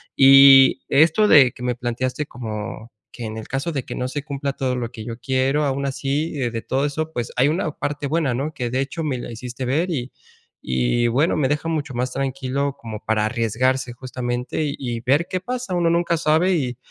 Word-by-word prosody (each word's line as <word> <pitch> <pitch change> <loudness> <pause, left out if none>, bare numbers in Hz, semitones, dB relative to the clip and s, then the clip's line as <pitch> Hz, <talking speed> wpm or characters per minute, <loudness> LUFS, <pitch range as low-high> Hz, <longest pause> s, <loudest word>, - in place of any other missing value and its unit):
Y 135 -1 +8
esto 160 +9 +4
de 135 -9 +7
que - - -14
me 125 -1 -1
planteaste 125 +4 -3
como 110 0 -7 0.2
que 120 - -9
en 110 0 -6
el 110 - -7
caso 135 +6 -2
de 135 -5 -3
que - - -6
no 125 0 -3
se 145 +1 -4
cumpla 140 -1 -3
todo 130 -2 -2
lo 120 -2 -4
que 110 -3 -9
yo 115 -1 -6
quiero, 135 +3 +1
aun 140 0 -1
así 140 +3 -2
de 120 -5 -2
todo 135 +4 -1
eso, 155 +2 -3
pues 120 -4 -3
hay 125 +3 +4
una 160 0 -1
parte 145 0 -4
buena, 150 -3 0
¿no?, 140 +6 -3
que 125 -5 -3
de 130 +2 0
hecho 140 +5 -4
me 135 -4 -1
la 120 - -7
hiciste 120 +2 -7
ver, 155 +9 0
y 130 -5 -3 0.6
y 65 - +1
bueno, 135 +8 +1
me 145 -3 +2
deja 150 +4 -1
mucho 150 -4 -3
más 125 +1 -2
tranquilo 135 +1 -2
como 110 -4 -7
para 110 -1 +1
arriesgarse 120 +3 0
justamente 125 +2 -4
y 145 -1 -3
y 120 -3 -3
ver 140 +8 +2
qué 185 - -1
pasa, 245 -3 -4
uno 170 -1 +2
nunca 170 0 +1
sabe 160 +4 +2
y 125 -5 -3
135 Hz, 215 wpm, -22 LUFS, 120-150 Hz, 0.6 s, Y